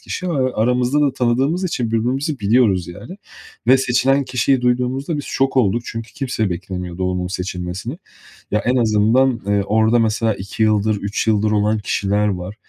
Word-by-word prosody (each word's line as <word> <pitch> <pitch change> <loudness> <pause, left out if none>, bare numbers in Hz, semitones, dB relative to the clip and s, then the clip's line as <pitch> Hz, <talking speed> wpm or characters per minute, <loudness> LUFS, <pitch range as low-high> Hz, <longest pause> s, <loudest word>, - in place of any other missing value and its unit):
kişi 185 - -5
ve 130 -6 0
aramızda 125 +5 +1
da 145 -3 +2
tanıdığımız 135 +8 0
için 145 -10 -1
birbirimizi 130 +6 -1
biliyoruz, 100 -4 +2
yani. 100 - -9 0.5
Ve 130 +2 +6
seçilen 130 +2 +2
kişiyi 125 +1 +1
duyduğumuzda 125 +5 0
biz 145 - -4
şok 135 0 -1
olduk. 115 -1 +2
Çünkü 115 0 -7
kimse 120 -7 -2
beklemiyordu 90 0 -5
onun 90 0 -2
seçilmesini. 90 - -5 0.5
Ya, 105 - +2
en 125 +2 +1
azından, 115 +2 +2
eee, 100 0 +2
orada 110 +3 +3
mesela 110 0 +1
2 100 +3 -5
yıldır, 110 0 +2
3 100 +2 -3
yıldır 105 -1 +2
olan 105 +1 +1
kişiler 105 0 0
var. 95 0 -4
115 Hz, 160 wpm, -19 LUFS, 100-130 Hz, 0.5 s, Ve